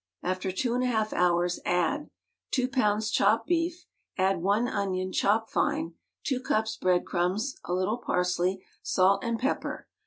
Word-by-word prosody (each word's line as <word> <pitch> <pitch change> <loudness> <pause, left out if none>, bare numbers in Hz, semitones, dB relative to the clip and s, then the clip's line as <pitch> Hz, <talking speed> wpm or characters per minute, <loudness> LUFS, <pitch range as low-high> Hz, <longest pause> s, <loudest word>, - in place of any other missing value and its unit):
After 185 +1 -1
two 235 +6 -1
and 250 - +1
a - - +2
half 220 -3 0
hours 175 0 +2
add: 275 - 0 0.4
Two 255 -2 +1
pounds 215 -5 +1
chopped 225 +1 +3
beef; 345 +1 -1 0.3
add 190 -2 +2
one 205 +6 +2
onion, 185 -4 -2
chopped 220 +4 +1
fine, 165 +1 0 0.3
two 265 -3 0
cups 220 -3 0
bread 180 -1 +1
crumbs, 195 +9 -1
a 175 - -2
little 190 +6 0
parsley, 180 -1 0 0.2
salt 195 +1 +3
and 235 -1 -1
pepper. 260 +4 -2
200 Hz, 155 wpm, -28 LUFS, 185-240 Hz, 0.4 s, chopped